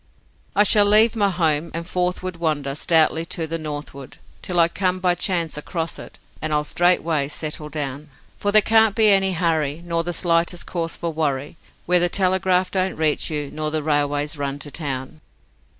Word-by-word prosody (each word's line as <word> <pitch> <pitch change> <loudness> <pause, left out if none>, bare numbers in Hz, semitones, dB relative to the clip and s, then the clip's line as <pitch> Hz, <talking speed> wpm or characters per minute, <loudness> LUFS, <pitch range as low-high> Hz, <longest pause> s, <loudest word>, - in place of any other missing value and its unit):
I 205 - +5
shall 210 0 +5
leave 215 +3 +5
my 205 -3 +2
home, 165 -3 +1
and 165 0 -4
forthward 180 0 -2
wander 150 -4 -2
stoutly 160 +1 +3
to 170 -1 -2
the 165 +1 -4
northward 145 -3 -7 0.2
Till 180 -1 -2
I 165 - +6
come 185 +1 -1
by 180 -1 +2
chance 170 -4 -1
across 165 +1 -4
it, - - -11 0.2
and 155 - -1
I'll 150 0 +1
straightway 165 -3 +1
settle 150 0 -4
down, 145 0 -5 0.3
For 205 - 0
there 215 0 +6
can't 220 -1 +3
be 220 -2 +4
any 195 -1 +3
hurry, 160 -3 -1
nor 170 -1 -1
the 175 - -3
slightest 170 -2 +1
cause 165 -2 -3
for 170 -1 -4
worry 145 -1 -2 0.3
Where 180 0 +4
the 175 0 +2
telegraph 185 0 +1
don't 190 0 -1
reach 155 -1 0
you 150 -3 -4
nor 155 0 -3
the 155 0 -3
railways 145 0 -1
run 140 0 -3
to 145 - -10
town. 140 0 -5
165 Hz, 180 wpm, -21 LUFS, 150-180 Hz, 0.3 s, I